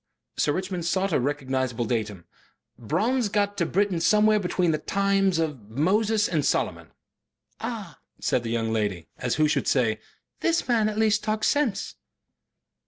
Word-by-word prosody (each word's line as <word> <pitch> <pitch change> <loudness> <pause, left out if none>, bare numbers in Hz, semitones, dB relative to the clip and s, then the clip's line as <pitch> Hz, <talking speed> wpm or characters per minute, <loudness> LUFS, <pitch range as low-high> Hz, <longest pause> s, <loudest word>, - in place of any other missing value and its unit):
Sir - - +1
Richmond 185 -1 -3
sought 190 +1 0
a - - +3
recognizable 130 -3 -1
datum. 105 -6 -3 0.5
"Bronze 210 - 0
got 205 0 0
to 170 - +1
Britain 195 -2 +1
somewhere 210 +6 +4
between 180 -2 +1
the 155 - -1
times 195 -2 +1
of 145 -10 -3
Moses 205 - +2
and 155 -4 0
Solomon." - - -1 0.7
"Ah!" - - -6 0.2
said 125 - +1
the 115 - -5
young 115 -1 -1
lady, 100 -6 -2
as 125 -2 -1
who 155 0 +3
should 150 - 0
say, 110 -5 +2 0.4
'This 335 0 +1
man 225 -3 +2
at 215 - -5
least 215 -1 +2
talks 215 0 +1
sense. 285 -8 -1
175 Hz, 155 wpm, -25 LUFS, 125-210 Hz, 0.7 s, somewhere